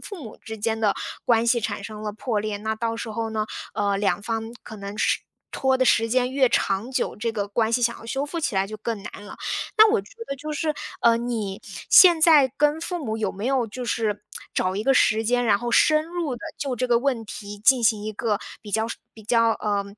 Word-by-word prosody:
父 400 -6 -8
母 220 -4 -9
之 220 -1 -8
间 220 +1 -1
的 215 -2 +2 0.3
关 235 -1 +3
系 235 0 +3
产 205 -2 -3
生 215 -1 -7
了 210 -1 -3
破 220 -1 -2
裂， 210 -1 -3
那 220 +1 -2
到 230 +1 -2
时 230 - -5
候 225 0 -3
呢， 215 -1 -2 0.3
呃， 200 -1 +1
两 205 0 0
方 225 +1 -3
可 220 - -10
能 200 +1 -7
时 - - +2 0.3
拖 265 -1 +1
的 255 - +2
时 225 -2 +3
间 250 +1 +1
越 265 -2 +4
长 200 +5 0
久， 265 - -1
这 230 +2 -2
个 205 -2 -2
关 220 +2 0
系 245 - +2
想 235 0 +1
要 - - -13
修 270 +4 -2
复 335 +2 -4
起 225 - -1
来 190 0 +1
就 215 +1 -7
更 215 -1 -4
难 205 - -9
了。 - - -10 0.4
那 435 0 +8
我 455 - +3
觉 - - -17 0.2
得 275 - -3
就 305 +2 -6
是， 305 0 -1 0.3
呃， 230 -1 +5
你 225 -5 -3 0.3
现 345 -4 +8
在 305 -5 +6
跟 295 +2 +2
父 345 -1 -4
母 220 -1 -2
有 220 - -1
没 205 +5 -5
有 260 -3 +1
就 245 +4 -6
是 215 -3 -1 0.3
找 185 +1 0
一 210 - -1
个 270 - +3
时 220 -2 +3
间， 245 +2 +1
然 205 -3 +3
后 240 0 -3
深 310 +5 +4
入 335 -6 -3
地 - - -13 0.2
就 270 -3 -2
这 255 - 0
个 235 -1 +4
问 245 -4 -1
题 205 0 -8
进 245 +3 +4
行 215 -2 +3
一 215 - -3
个 215 -1 -1 0.2
比 210 - -9
较 220 +2 +1 0.3
比 220 - -13
较， 230 +1 +3
呃， 205 -2 -1
230 Hz, 260 characters per minute, -24 LUFS, 215-255 Hz, 0.4 s, 那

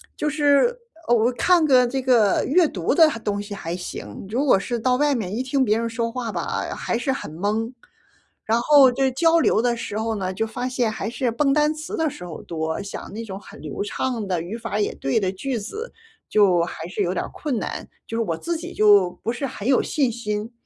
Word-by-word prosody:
就 300 - -1
是 295 - +3 0.3
我 240 +1 +3
看 345 +5 +3
个 255 -4 +5
这 265 +2 -2
个 240 -6 +3
阅 330 +3 +4
读 180 - -1
的 320 +2 +7 0.2
东 205 -1 -1
西 205 0 -7
还 170 -3 -4
行， 180 - -7
如 255 +7 0
果 250 - +5
是 240 +4 -3
到 250 +2 +2
外 290 0 +2
面 210 -4 -3
一 245 - -1
听 260 +1 +1
别 215 0 +2
人 230 0 -2
说 230 0 -2
话 235 -2 -4
吧， 170 -3 -3
还 - - -2
是 265 - 0
很 260 - -5
懵。 215 +6 -1 0.7
然 225 +2 +2
后 275 0 +7
就 265 +2 +1
交 330 +5 +3
流 270 - +3
的 240 0 +1
时 210 - -5
候 225 +1 -1
呢， 190 -2 -2
就 225 +4 -1
发 245 +3 -4
现 245 -3 0
还 220 - -4
是 240 +1 -1
蹦 275 +4 +1
单 300 0 +3
词 310 +1 -6
的 320 - +1
时 180 - -10
候 170 -3 -8
多， 160 -1 -3
讲 200 - -7
那 225 - -5
种 195 -2 -7
很 - - -13
流 150 +4 -5
畅 225 0 -3
的， 180 -2 0
语 175 +6 -6
法 230 -3 -3
也 205 - 0
对 135 +7 0
的 190 -3 0
句 250 +6 -3
子 420 - -6 0.4
就 190 -5 +4
还 165 -1 -6
是 200 - -3
有 180 -2 +1
点 - - -2
困 280 -6 -3
难， - - -5 0.2
就 225 - -5
是 - - +1
我 170 -6 -2
自 340 - -3
己 320 - -7
就 205 -3 +5
不 230 - -1
是 275 0 -3
很 205 -2 -6
有 265 -2 +4
信 270 -6 +1
心。 210 -1 -4
230 Hz, 245 characters per minute, -23 LUFS, 205-265 Hz, 0.7 s, 的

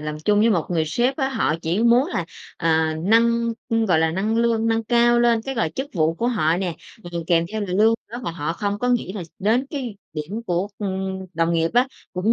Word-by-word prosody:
làm 150 0 -4
chung 210 0 +3
với 230 - +4
một 170 -7 +1
người 160 -2 +1
sếp 245 - 0
á, 265 -3 0
họ 225 - 0
chỉ 175 +7 0
muốn 240 +4 +5
là, - - -2 0.3
à, 160 -1 +1
nâng, 235 +2 +3 0.4
gọi 160 -3 +4
là, 160 0 +2
nâng 205 +6 -1
lương 230 -1 +2
nâng 225 0 +1
cao 240 +1 +4
lên 235 -1 +3
cái, 270 +2 -4
gọi, 165 -9 0
chức 265 +8 -5
vụ 160 -1 +2
của 235 - -2
họ 165 -8 +1
nè, 180 -3 -2 0.4
ừm, 170 - -3
kèm 165 -1 +3
theo 220 - -2
là 205 - -2
lương 210 +5 +3 0.2
nữa, 240 - -5
mà - - -2
họ 165 -1 -3
không 205 +3 -2
có 245 - -1
nghĩ 240 -6 0
là 205 - -5 0.2
đến 225 +7 +1
cái 255 -9 -5 0.2
điểm 170 +9 -5
của, 180 +3 0
ưm, 190 -1 -3
đồng 165 +1 +1
nghiệp 165 0 +1
á, 250 +2 +4 0.3
cũng 185 +5 +1
205 Hz, 235 wpm, -22 LUFS, 170-235 Hz, 0.4 s, muốn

